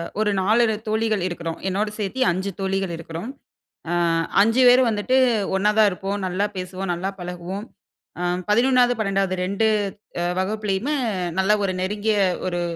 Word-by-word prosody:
அ - - -3 0.2
ஒரு 210 -1 +2
நாலு 220 +2 +3
தோழிகள் 220 -3 0
இருக்குறோம், 170 -2 -5
என்னோட 205 +3 0
சேத்தி 215 +6 -2
5 190 +3 -3
தோழிகள் 195 -2 -1
இருக்குறோம். 165 +8 -7 0.6
அ - - 0 0.5
5 225 +4 +2
பேரும் 250 +1 +6
வந்துட்டு 220 +5 +1 0.4
ஒண்ணாதா 210 +2 +4
இருப்போம், 195 +2 -4
நல்லா 195 +3 0
பேசுவோம், 185 0 -4
நல்லா 190 +3 -3
பழகுவோம். 180 +4 -6 0.5
அ - - -2 0.3
11, 245 +2 +4
12 195 -2 0
ரெண்டு 200 +4 0 0.6
அ - - 0 0.2
வகுப்புலயுமே 215 +7 -1 0.4
நல்ல 190 +2 +3
ஒரு 185 - -1
நெருங்கிய 210 +2 0 0.3
ஒரு 175 -1 -2
200 Hz, 140 wpm, -22 LUFS, 185-220 Hz, 0.6 s, பேரும்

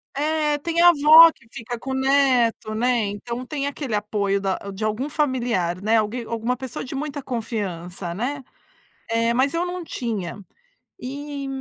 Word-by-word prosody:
é 300 0 +1
tem 335 +3 -1
a 350 - +9
avó 320 +1 +8
que 235 - -25
fica 240 +1 -6
com 265 +2 -5
neto, 265 -5 +2
né. 240 0 +1
Então 235 +5 -5
tem 285 0 -3
aquele 275 -6 -3
apoio 205 -1 -1
da 195 -1 -1 0.2
de 200 - -6
algum 215 +7 -1
familiar, 240 - 0
né, 220 +2 +3
alguém, 220 +3 -1
alguma 230 +2 -2
pessoa 260 -2 -6
de 270 +1 -7
muita 285 0 -4
confiança, 195 -8 -4
né, 265 +7 -3 0.7
eh, 230 +1 +1
mas 265 +5 +2
eu 340 +2 0
não 360 0 -5
tinha. 215 - -4 0.6
E 280 +1 -6
245 Hz, 160 wpm, -23 LUFS, 215-285 Hz, 0.7 s, a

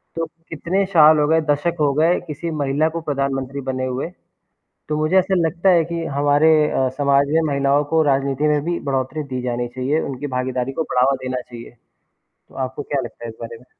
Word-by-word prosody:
तो 165 0 -1 0.2
कितने 180 +5 -1
साल 155 -2 +7
हो 150 - +2
गए, 160 +1 +3
दशक 145 +4 +1
हो 145 -2 +2
गए 160 +5 +2
किसी 165 +2 -5
महिला 145 +3 +1
को 165 +1 -5
प्रधानमंत्री 135 -1 -2
बने 130 0 -3
हुए, 130 +5 -3 0.8
तो 150 - -1
मुझे 155 +5 +1
ऐसा 190 +1 +1
लगता 175 +4 +1
है 170 -2 +4
कि 170 0 -4
हमारे 145 +2 +4 0.2
अ, 130 -1 +1
समाज 140 0 +3
में 165 - +4
महिलाओं 140 +1 +2
को 160 - +4
राजनीति 135 +2 0
में 150 -1 +2
भी 170 +1 -1
बढ़ोत्तरी 135 +3 -2
दी 125 - -3
जानी 120 -1 -2
चाहिए, 130 +5 -1
उनकी 140 0 -5
भागीदारी 130 0 -2
को - - +3
बढ़ावा 130 -2 +2
देना 130 0 -3
चाहिए। 120 -1 -12 0.7
तो - - -19
आपको 130 +3 -7
क्या 140 -1 -2
लगता 120 0 -10
है - - -5
इस 110 - -10
बारे 115 0 -7
में? 120 - -20
140 Hz, 205 wpm, -20 LUFS, 130-160 Hz, 0.8 s, साल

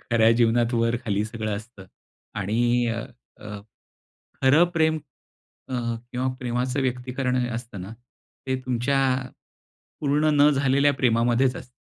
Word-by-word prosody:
खऱ्या 115 -1 +3
जीवनात 120 +1 +3
वर, 115 +1 +2
खाली 105 -1 0
सगळं 110 -2 -3
असतं. 105 -2 -11 0.5
आणि 120 +4 +1
अ, 115 0 -2 0.4
अ, 105 -1 -8 0.8
खरं 145 +6 +6
प्रेम 160 -1 +2 0.7
अ, 130 - -4 0.4
किंवा 125 +1 -1
प्रेमाचं 125 +2 -1
व्यक्तीकरण 125 0 -1 0.2
असतं 115 -5 -6
ना 95 +4 -7 0.5
ते 130 0 0
तुमच्या 125 +2 0 1.0
पूर्ण 150 +1 +2
न 145 - +7
झालेल्या 140 0 +3
प्रेमामध्येच 120 +1 +2
असतं. 125 - -11
120 Hz, 120 wpm, -24 LUFS, 115-130 Hz, 1.0 s, न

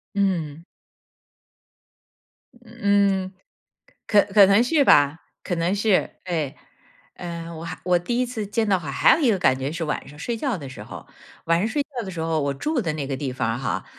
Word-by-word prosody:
嗯。 170 -6 -1 2.0
嗯， 200 -4 +1 0.8
可 205 -1 +5
可 200 -2 +8
能 200 +4 +5
是 285 +2 +3
吧， 145 - +5 0.2
可 180 - -2
能 170 +3 0
是， 205 -2 +2
哎。 160 -6 -3 0.6
呃， 170 -1 -6
我 160 - -8
还 165 - -6
我 180 -1 +3
第 235 +8 -2
1 255 - +2
次 230 -4 -5
见 220 +2 -1
到 195 -2 +2
海 155 -5 -6
还 140 - +5
有 320 - -2
一 250 - +4
个 200 - +1
感 130 -6 +2
觉 135 +2 -3
是 165 0 -3
晚 150 -2 -4
上 145 - -13
睡 230 +9 -3
觉 260 -3 -1
的 140 -6 -8
时 - - -9
候。 - - -10 0.4
晚 165 0 +2
上 215 - 0
睡 285 +4 0
觉 270 -4 -7
的 190 - -6
时 180 - -9
候， 160 -1 0
我 140 -1 -1
住 295 - -1
的 175 -7 -2
那 145 -3 -4
个 135 - -3
地 135 0 -3
方 125 -2 -2
儿 120 - -3
哈， 95 -8 -3
180 Hz, 215 characters per minute, -23 LUFS, 150-215 Hz, 2.0 s, 可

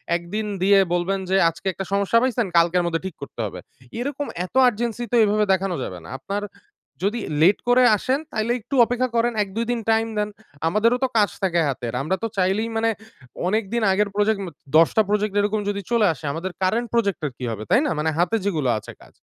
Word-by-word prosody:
একদিন 175 +6 -3 0.2
দিয়ে 200 +1 +6
বলবেন 180 +3 0
যে 190 - +2
আজকে 165 +4 -8
একটা 195 - -5
সমস্যা 200 +3 +2
পাইছেন, 245 -2 +1
কালকের 175 +1 +3
মধ্যে 165 -1 -1
ঠিক 190 -4 -5
করতে 140 - -10
হবে। 95 -3 -6 0.4
এইরকম 285 +4 -3 0.2
এত 185 - -15
urgency 240 0 -1
তো - - +2
এইভাবে 210 0 +2
দেখানো 190 -1 -1
যাবে 90 -5 -6
না। 85 - -11
আপনার 200 +10 -4 0.6
যদি 210 +4 0 0.2
late 185 +5 +5
করে 250 +1 +5
আসেন 260 +7 0
তাইলে 220 +2 0
একটু 245 +6 -5
অপেক্ষা 250 +2 -1
করেন। 235 +1 +2
১ 195 - -10
২ 230 +1 -1
দিন 240 - -1
টাইম 225 0 +2
দেন। 210 0 0 0.4
আমাদেরও 220 +8 +2
তো - - +3
কাজ 210 -2 +4
থাকে 175 -2 +2
হাতের। 125 -4 -3
আমরা 155 +7 0
তো - - +1
চাইলেই 195 +5 +1
মানে 225 0 +2 0.6
অনেকদিন 220 +3 0
আগের 200 +2 +1
প্রজেক্ট 210 0 +2
মা 175 - -7 0.3
১০ 165 0 +6
টা - - +7
প্রজেক্ট 210 0 0
এরকম 210 +1 0
যদি 200 0 -2
চলে 230 -3 +4
আসে, 160 +1 -11
আমাদের 175 +4 -4
current 230 +6 +1
প্রজেক্টের 200 - 0
কি 125 - -8
হবে, 110 -1 -5
তাই 265 - +4
না? - - -1
মানে 160 - +1
হাতে 175 +6 +2
যেগুলো 155 -10 0
আছে - - -11
কাজ। - - -19
205 Hz, 210 wpm, -22 LUFS, 175-230 Hz, 0.6 s, টা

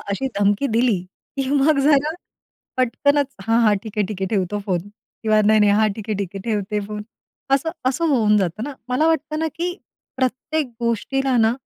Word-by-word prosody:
अशी 265 +7 -1
धमकी 205 +7 +2
दिली, 230 -3 +2 0.4
की 270 -1 -1
मग 285 +1 +3
जरा 295 0 +4 0.7
पटकनच, 280 +4 +2 0.2
"हां, 225 +3 +2
हां, 210 -2 +4
ठीक 220 -1 -8
आहे, 205 - +2
ठीक 195 -1 -6
आहे, - - +1
ठेवतो 205 0 -1
फोन" 180 -3 +1 0.4
किंवा 215 -1 +3
"नाही, 215 -1 +5
नाही. 205 -1 +5
हां, 215 - +4
ठीक 215 0 -8
आहे, 210 - 0
ठीक 195 -3 -3
आहे 195 - -5
ठेवते 210 -1 -1
फोन." 210 0 -6 0.5
असं 300 +4 0 0.2
असं 330 +6 0
होऊन 215 -4 +4
जातं 195 +3 -1
ना. 290 - -5 0.2
मला 305 +5 +3
वाटतं 305 0 -2
ना, 320 - +1
की 345 - 0 0.5
प्रत्येक 265 +4 -1 0.2
गोष्टीला 260 +3 0
ना, 220 - +3
230 Hz, 190 wpm, -21 LUFS, 210-275 Hz, 0.7 s, नाही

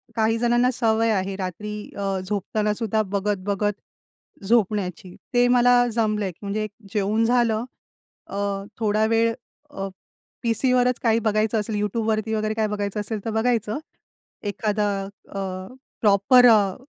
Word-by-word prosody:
काही 225 0 +2
जणांना 240 +2 +3
सवय 225 -1 +2
आहे 195 -1 -1
रात्री 200 +3 -5 0.2
अ, 195 -1 -1
झोपताना 210 +1 -1
सुद्धा 220 0 0
बघत-बघत 205 +1 0 0.7
झोपण्याची. 195 -4 0 0.2
ते 245 0 +4
मला 245 0 +5
जमलंय 210 -4 0
की - - -26
म्हणजे 205 +2 -2
एक 215 - -5 0.2
जेऊन 215 +2 +1
झालं 235 -2 +2 0.6
अ, - - -8 0.4
थोडा 215 0 +2
वेळ 230 +1 +2 0.4
अ, 195 0 -5 0.6
पीसीवरच 250 +2 +2
काही 225 0 +3
बघायचं 215 0 +1
असेल, 210 +1 -3
YouTubeवरती 220 +1 -1
वगैरे 215 0 0
काय 220 -1 0
बघायचं 205 0 -3
असेल, 210 +1 -3
तर - - -1
बघायचं. 220 +1 0 0.6
एखादा 210 0 -1 0.4
अ, 195 - -4 0.6
प्रॉपर 215 +5 +6
अ, 205 -4 +4
215 Hz, 130 wpm, -23 LUFS, 205-230 Hz, 0.7 s, प्रॉपर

